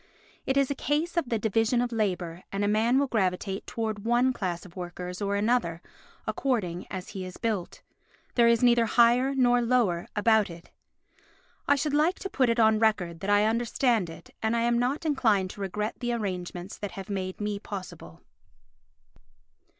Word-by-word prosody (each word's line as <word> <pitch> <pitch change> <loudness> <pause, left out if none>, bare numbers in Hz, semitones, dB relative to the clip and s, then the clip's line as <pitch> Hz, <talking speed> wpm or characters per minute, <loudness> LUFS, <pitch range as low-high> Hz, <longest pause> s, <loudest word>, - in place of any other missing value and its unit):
It 265 - +1
is 275 0 +2
a - - +2
case 300 +5 -1
of 330 -8 0
the 230 - +1
division 225 +3 +1
of 245 0 0
labour 180 -6 -2
and 195 +1 -1
a - - +1
man 220 +4 +3
will 280 - +3
gravitate 195 -4 -1
towards 220 -2 -3
one 240 +4 +2
class 180 -6 -3
of 175 - -14
workers 180 +1 -6
or 200 0 0
another 205 -6 +1 0.5
according 195 -10 -1
as 185 -1 -6
he 190 - -6
is 185 -1 -8
built. 215 -6 -3 0.5
There 235 -1 +4
is 235 +1 +3
neither 235 -1 +5
higher 245 +4 +4
nor 245 -2 +4
lower 230 -8 +1
about 220 -1 +3
it. 170 0 -12 1.0
I 285 - +5
should 285 +1 -1
like 310 +5 +2
to 390 - -6
put 255 -3 +2
it 230 0 +1
on 220 -1 +5
record 185 -7 +1
that 195 +3 -4
I 205 +1 +4
understand 230 -3 +1
it 165 - -12
and 220 +1 +1
am 235 0 +2
not 265 +6 -1
inclined 215 -11 +2
to 205 - -10
regret 210 +3 -3
the 240 -1 -1
arrangements 185 -4 -4
that 205 -2 -5
have 195 -1 -7
made 185 -1 -3
me 210 -1 -2
possible. 185 - -8
220 Hz, 180 wpm, -27 LUFS, 190-245 Hz, 1.0 s, neither